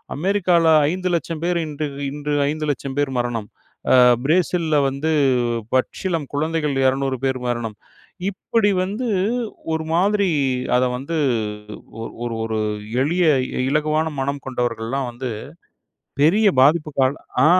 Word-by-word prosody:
"அமெரிக்கால 180 0 +2 0.3
500000 175 -3 -2
பேர் 175 0 +1
இன்று 150 0 -4 0.2
இன்று 150 0 -3 0.2
500000 145 -3 -3
பேர் 145 -2 +1
மரணம். 115 -3 -2 0.4
அ - - +7 0.3
பிரேசில்ல 165 -1 +1
வந்து 145 +4 -2 0.6
பச்சிளம் 155 +3 -1
குழந்தைகள் 150 -1 -1
200 135 0 0
பேர் 130 -1 0
மரணம்" 120 -3 -2 0.5
இப்படி 205 +2 0
வந்து 210 +7 -3 0.7
ஒரு 160 0 -1
மாதிரி 200 +3 +2 0.5
அத 125 - +3
வந்து 140 +6 -5 0.9
ஒ - - -4 0.2
ஒரு 115 -1 -3
ஒரு 110 -1 -2 0.4
எளிய 170 +5 +2 0.2
இ - - -10 0.2
இலகுவான 155 +2 +1
மனம் 140 +1 -2
கொண்டவர்கள்லாம் 125 +1 -2
வந்து 125 +1 -5 0.9
பெரிய, 205 +8 +4 0.2
பாதிப்புக்காளா 145 -3 +2 0.3
ஆ - - +6
150 Hz, 115 wpm, -21 LUFS, 135-170 Hz, 0.9 s, அ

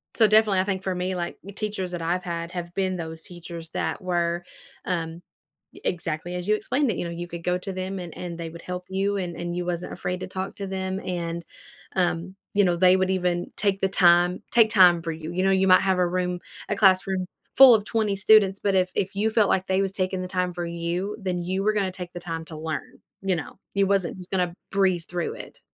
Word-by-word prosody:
so 225 - +6
definitely, 215 -2 +4
I - - +3
think 190 -2 -1
for 190 -1 -1
me, 180 +1 -1
like, 175 -1 -4
y 200 +1 -10
teachers 200 -3 -3
that 175 -1 -4
I've 175 +2 -1
had 170 -1 -4
have 175 -1 -5
been 185 -1 0
those 160 -1 -6
teachers 170 -1 -9
that - - -2
were, 175 -1 0 0.4
um, 165 -1 -3 0.6
exactly 170 0 -2
as 180 +1 -4
you 215 - +4
explained 260 +6 0
it, - - -3
you - - -2
know, 170 - -4
you 175 +1 -5
could 170 -1 -8
go 180 0 +1
to 190 +1 -6
them 185 +1 -4
and 175 -2 -8
and 175 -2 -5
they 170 - -5
would 170 +1 -10
help 180 0 -5
you 195 +2 0
and 175 -3 -3
and 175 0 -4
you 180 - -2
wasn't 175 0 -3
afraid 180 0 -3
to - - -4
talk 190 +1 -5
to 200 - -4
them, 190 0 -3
and, 170 -1 -3 0.5
um, 175 0 0 0.2
you 205 - +4
know, 175 - +2
they 185 +1 +6
would 190 0 +1
even 180 -1 0
take 200 -1 +1
the 195 - +2
time 175 -1 +4
take 230 -2 +5
time 180 -5 +6
for 165 0 -3
you, 160 +1 -6
you 185 +1 0
know, 195 - +4
you 190 0 +3
might 185 0 +7
have 190 -1 +1
a 180 - +3
room 180 0 -1 0.3
a 210 - +1
classroom 190 -1 +3 0.3
full 265 -3 +10
of 210 - 0
20 215 -3 0
students, 195 -1 +5
but 200 - +2
if 185 -1 +3
if 195 0 -1
you 215 +2 +2
felt 220 -3 +3
like 190 0 +1
they 190 +1 +2
was 195 - 0
taking 185 -1 -1
the 185 - -4
time 180 -1 -1
for 175 0 -3
you, 170 +4 -3
then 185 -2 -1
you 185 +2 -1
were 215 +1 +3
gonna 195 -3 0
take 180 -1 -8
the 175 - -6
time 165 -1 -5
to 160 - -10
learn, 155 0 -5 0.2
you 195 -1 +1
know? 165 +3 -7 0.2
You 200 0 +4
wasn't 195 -3 +1
just 180 -1 -8
gonna 180 -2 0 0.2
breeze 190 -3 +2
through 175 -1 -3
it. - - -11
185 Hz, 240 wpm, -25 LUFS, 175-195 Hz, 0.6 s, full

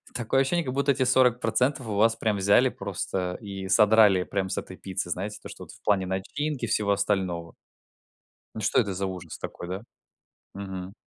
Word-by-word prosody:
такое 125 +3 +1
ощущение, 170 +5 +1
как 130 - -3
будто 140 +1 +2
эти 130 - 0
40% 125 0 +2
у 105 - -2
вас 115 +2 +4
прям 110 -3 0
взяли 100 +1 +4
просто 90 -1 -4
и 95 -2 -6
содрали 105 -1 +5
прям 95 -1 -2
с - - -3
этой 95 - -6
пиццы 95 -2 -4
знаете, 105 +4 -4
то - - -8
что - - -10
в - - -15
плане 100 -3 +2
начинки 120 +9 -3
всего 105 -1 +1
остального. 95 -4 -1 1.0
Ну 110 - -4
что 105 - +2
это 100 -5 0
за 95 +1 -2
ужас 95 -2 -6
такой, 85 - -7
да? 95 +4 -5 0.7
Мгм. 95 -1 -6
100 Hz, 180 wpm, -26 LUFS, 95-115 Hz, 1.0 s, содрали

